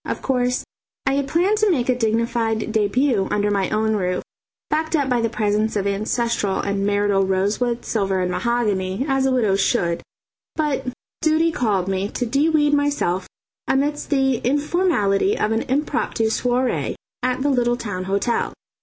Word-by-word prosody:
Of - - -4
course, 250 -1 0 0.4
I 270 - +2
had 280 0 0
planned 380 +8 +2
to 430 -1 +3
make 260 -10 +1
a 255 - +4
dignified 225 -1 0
debut 220 0 +1
under 205 0 +1
my 195 -2 0
own 220 0 +1
roof, 180 -3 -1 0.5
backed 315 +2 0
up 285 -3 +1
by 245 -2 +2
the 230 - +1
presence 215 -1 0
of 200 -1 0
ancestral 210 0 0
and 200 0 -1
marital 205 -1 +2
rosewood, 205 +6 0
silver 195 -4 0
and 180 0 0
mahogany, 200 +1 0
as 270 -1 +2
a - - +1
widow 225 -7 +2
should; 185 -4 +1 0.5
but 290 -4 -1 0.3
duty 320 +1 +3
called 205 - 0
me 195 +1 -1
to 245 - -2
de 280 +7 +2
weed 295 -2 +3
myself 285 -11 0 0.4
amidst 290 +2 0
the 270 -3 +2
informality 290 - +1
of 210 - 0
an 225 +1 +1
impromptu 265 -5 0
soirée 250 +2 0 0.3
at 255 +1 0
the 290 - +2
little 240 -2 +2
town 185 -6 -4
hotel. 200 +5 0
235 Hz, 165 wpm, -21 LUFS, 200-270 Hz, 0.5 s, a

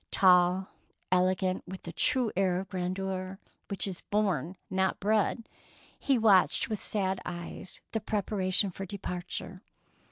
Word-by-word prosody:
Tall, 180 0 +4 0.4
elegant, 185 0 +2
with 190 +1 -8
the 170 - -6
true 245 +5 +2
air 185 -1 +2
of 190 0 -7
grandeur 185 0 -3 0.3
which 200 - -1
is 190 -3 -4
born, 190 -5 -1
not 190 0 0
bred, 215 +2 +1 0.5
he 270 -2 +2
watched 210 -3 +4
with 215 -3 -3
sad 190 -2 0
eyes 175 +1 -6
the 225 - -1
prepara 205 -2 -2
tions 190 0 +3
for 195 +2 -6
departure. 185 -1 -5
190 Hz, 135 wpm, -30 LUFS, 185-200 Hz, 0.5 s, Tall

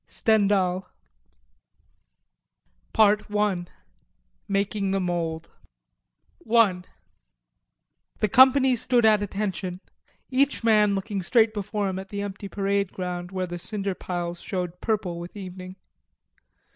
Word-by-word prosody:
STENDHAL 195 -4 +2 2.1
PART 210 -1 +3
ONE: 205 -4 0 0.8
MAKING 200 0 -1
THE 195 0 +1
MOULD 170 -3 -2 1.0
I 210 -6 +4 1.4
The 215 - +1
company 260 +3 +6
stood 240 0 +2
at 215 -1 +5
attention, 195 -3 -3 0.5
each 270 -1 +1
man 210 -3 +4
looking 195 0 -3
straight 220 +4 +3
before 205 0 -2
him 190 0 -3
at 190 0 -9
the 200 0 -4
empty 200 0 -6
parade 200 -1 -1
ground, 180 -1 -5
where 185 -1 -3
the 175 0 -6
cinder 200 +1 -3
piles 175 -1 -4
showed 180 -2 -5
purple 200 -6 -1
with 175 +4 -9
evening. 185 -1 -8
195 Hz, 110 wpm, -25 LUFS, 180-210 Hz, 2.1 s, company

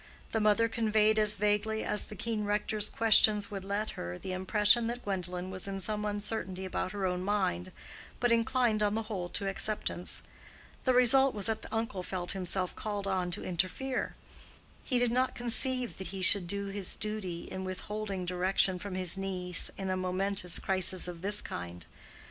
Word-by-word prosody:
The 225 - 0
mother 215 +2 +3
conveyed 220 -1 +2
as 210 0 +4
vaguely 210 +2 0
as 210 - +3
the 210 - -9
keen 220 +2 -2
rector's 210 0 0
questions 215 -2 +4
would 195 -2 -5
let 205 +2 -2
her 90 +1 -6
the 185 - -6
impression 210 +5 +3
that 240 +1 -5
Gwendolen 180 -2 -3
was 185 +1 -4
in 195 0 -4
some 210 +2 -3
uncertainty 205 -2 -2
about 185 0 -3
her 200 -2 -3
own 180 0 -1
mind, 190 - -1 0.5
but 245 -1 +2
inclined 230 -1 +2
on 210 0 +1
the 225 - -1
whole 195 -5 -5
to 200 - -3
acceptance. 195 -2 -1 0.6
The 255 - +3
result 260 +1 +6
was 205 -2 -1
that 220 -1 -1
the - - -10
uncle 225 -4 -2
felt 180 -1 -4
himself 185 -1 -1
called 205 -2 -4
on 185 -2 -1
to 175 - -3
interfere; 190 +9 -2 0.7
he 255 - +1
did 245 -1 +2
not 255 +2 +1
conceive 245 0 +2
that 190 - -5
he 190 -1 -4
should 180 -1 +4
do 200 +2 -1
his 195 -2 -1
duty 210 -5 -4
in 190 - -6
witholding 195 0 -5
direction 185 +1 +1
from 200 0 -6
his 185 0 0
niece 180 -2 0
in 190 -1 -3
a - - 0
momentous 185 -1 +1
crisis 185 -1 +3
of 175 -2 -7
this 205 +2 +5
kind. 85 -1 -6
200 Hz, 180 wpm, -30 LUFS, 185-215 Hz, 0.7 s, result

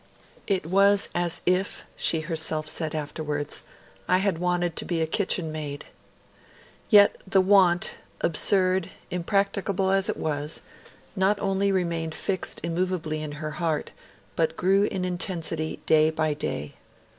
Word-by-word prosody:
'It 190 -5 0
was 200 +3 +4
as 175 -1 -1
if,' 185 +2 0
she 160 - +2
herself 160 -1 -2
said 155 0 -2
afterwards, 150 -1 -4 0.5
'I 185 - +4
had 190 -3 +1
wanted 175 -1 0
to - - -3
be 170 -2 -2
a 160 - +2
kitchen 170 -1 +1
maid.' 150 -2 -5 1.0
Yet 205 -3 +6
the 195 0 +3
want, 185 -2 +4 0.2
absurd 185 +2 +2
and - - -13 0.2
impracticable 195 +1 0
as 195 0 +3
it - - -1
was, 150 0 -3 0.5
not 195 +1 +2
only 195 0 +1
remained 170 -4 -1
fixed 190 -3 -2
immovably 170 -2 -2
in 150 -1 -5
her 155 +1 -5
heart, 160 -1 -2 0.4
but 165 -1 0
grew 195 +2 +3
in 190 -3 -2
intensity 170 -3 -3
day 155 0 +5
by 155 -1 0
day. 75 - -4
175 Hz, 140 wpm, -26 LUFS, 155-190 Hz, 1.0 s, Yet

